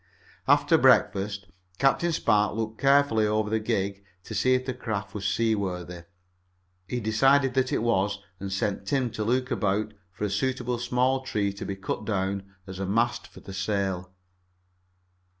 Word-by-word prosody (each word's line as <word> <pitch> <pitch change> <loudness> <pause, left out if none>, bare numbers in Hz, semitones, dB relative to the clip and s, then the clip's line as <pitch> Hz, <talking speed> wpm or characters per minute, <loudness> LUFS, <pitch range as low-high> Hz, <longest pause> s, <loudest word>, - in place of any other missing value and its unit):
After - - +4
breakfast 100 0 +3 0.3
Captain 140 +7 +2
Spark 105 -9 +2
looked 110 0 -4
carefully 135 -6 +4
over 105 0 0
the 110 - +2
gig 100 -3 -2 0.2
to 110 - -8
see 130 +5 +3
if 130 0 -1
the 130 - -2
craft 105 -6 -4
was 100 -2 -3
seaworthy. 95 -5 -1 0.8
He 125 - -2
decided 135 +5 +3
that 130 -1 +1
it - - 0
was, 100 -4 +1 0.2
and 100 0 -5
he 95 - -2
sent 100 0 -2
Tim 130 0 0
to 110 - -3
look 125 +3 0
about 105 +1 0 0.2
for 90 - -7
a 105 - 0
suitable 125 +2 -1
small 125 +2 +1
tree 105 -7 -1
to 100 - -7
be 100 - -3
cut 95 +2 -4
down 100 -2 -2
as 95 -1 -8
a 95 - -2
mast 115 +5 0
for - - -15
the 95 - -9
sail. 95 -2 -2
105 Hz, 170 wpm, -27 LUFS, 100-125 Hz, 0.8 s, After